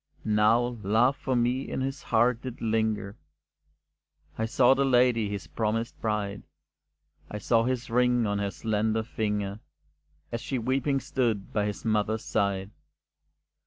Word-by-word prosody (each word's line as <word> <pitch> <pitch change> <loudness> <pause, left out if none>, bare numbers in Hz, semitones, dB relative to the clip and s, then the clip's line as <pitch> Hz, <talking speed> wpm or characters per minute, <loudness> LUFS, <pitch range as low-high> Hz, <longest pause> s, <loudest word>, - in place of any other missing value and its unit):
Now 115 +3 +2
love 115 +7 +3
for 130 -1 -2
me 125 +2 0
in - - -3
his 135 +1 -3
heart 120 +1 +2
did 130 -2 -7
linger 110 -2 -1 1.2
I 110 - -1
saw 125 +2 +5
the 135 +1 +1
lady, 125 -4 +3
his 100 -2 -5
promised 115 +1 -2
bride, 105 -2 -2 0.9
I 105 - -5
saw 115 +2 +2
his 125 -1 -1
ring 125 0 +2
on 100 -1 -1
her 100 -1 -1
slender 110 +1 -1
finger, 105 -2 -2 0.7
As 115 0 -3
she 130 +1 -3
weeping 135 +3 0
stood 115 -8 -1
by 105 -1 +1
his 105 - -5
mother's 110 0 0
side. 100 -1 -1
115 Hz, 140 wpm, -27 LUFS, 105-125 Hz, 1.2 s, saw